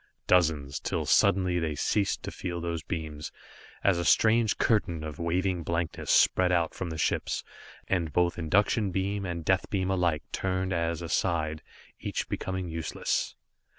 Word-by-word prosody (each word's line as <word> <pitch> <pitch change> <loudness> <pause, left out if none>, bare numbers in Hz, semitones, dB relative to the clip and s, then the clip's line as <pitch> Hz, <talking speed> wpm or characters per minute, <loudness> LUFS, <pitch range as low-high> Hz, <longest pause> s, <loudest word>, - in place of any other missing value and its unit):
Dozens 80 -6 +2
till - - -2
suddenly 90 -2 +3
they 80 -3 -2
ceased 100 +6 0
to - - -4
feel 85 -2 -4
those 85 -1 -3
beams, 80 -3 -5 0.5
as 95 -3 +3
a - - -1
strange 110 +5 +4
curtain 85 -8 +1
of 75 -2 -6
waving 90 +2 0
blankness 85 0 -3
spread 90 -1 +4
out 85 -2 +1
from 90 - -4
the 80 - -5
ships, - - -1 0.4
and 85 -5 0
both 90 +2 +1
induction 100 +5 +2
beam 95 +1 -2
and 85 -2 -4
death 95 +1 +1
beam 95 -1 0
alike 85 -5 +1
turned 95 0 -1
as 85 -1 -1
aside, 80 -2 0 0.4
each - - -3
becoming 95 -1 -3
useless. 80 -6 -2
85 Hz, 150 wpm, -28 LUFS, 80-95 Hz, 0.5 s, strange